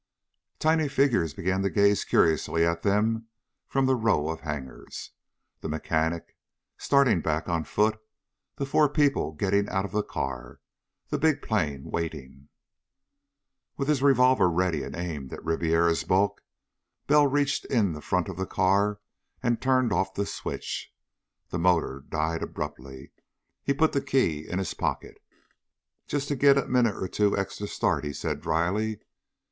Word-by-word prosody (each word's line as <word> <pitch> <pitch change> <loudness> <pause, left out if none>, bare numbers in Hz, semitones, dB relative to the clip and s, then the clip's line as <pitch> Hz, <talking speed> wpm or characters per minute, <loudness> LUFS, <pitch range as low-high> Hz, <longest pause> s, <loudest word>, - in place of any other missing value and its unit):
Tiny 155 -1 +2
figures 120 - +1
began 95 +2 -1
to 100 - +1
gaze 100 -1 +3
curiously 80 +1 +2
at 85 0 0
them 110 +3 +1 0.4
from 135 -1 +1
the 130 - +3
row 105 - +1
of 80 - -3
hangars. 70 -4 -7 0.5
The - - -5
mechanic, 80 +1 -2 0.4
starting 130 -10 +3
back 80 +1 -1
on 85 -2 -1
foot, 110 +1 +1 0.6
the 140 - -3
four 150 +2 +3
people 145 - +1
getting 100 +5 0
out 95 0 -1
of - - -7
the 105 - +1
car, 65 -9 -5 0.5
the - - -1
big 155 -2 +2
plane 75 -11 -1
waiting.... 75 -4 -5 1.3
With 140 - -2
his 150 -3 +2
revolver 125 -7 +5
ready 85 -3 0
and - - -6
aimed 80 -6 -5
at - - -9
Ribiera's 80 0 +2
bulk, 100 +2 +1 0.6
Bell 150 0 +5
reached 145 +1 0
in 105 -9 +1
the 75 - -8
front 90 +2 0
of 95 -3 -6
the 95 0 -3
car 100 +2 +1 0.4
and 120 -2 +1
turned 130 -4 +2
off 95 -1 0
the 100 - -1
switch. - - -5 0.6
The 85 - -3
motor 80 -6 +1
died 80 +2 -1
abruptly. 70 -2 -7 0.5
He - - -1
put 155 +3 +2
the 140 - 0
key 125 - 0
in 90 - -2
his 95 -3 -2
pocket. - - -4 0.9
"Just 145 -1 -2
to 145 - 0
get 140 +1 +5
a 140 - +1
minute 125 -5 +2
or 95 - -3
two 105 +2 +1
extra 100 +1 -3
start," - - 0
he 75 -1 -4
said - - -3
dryly. 100 +7 0
95 Hz, 155 wpm, -27 LUFS, 80-125 Hz, 1.3 s, revolver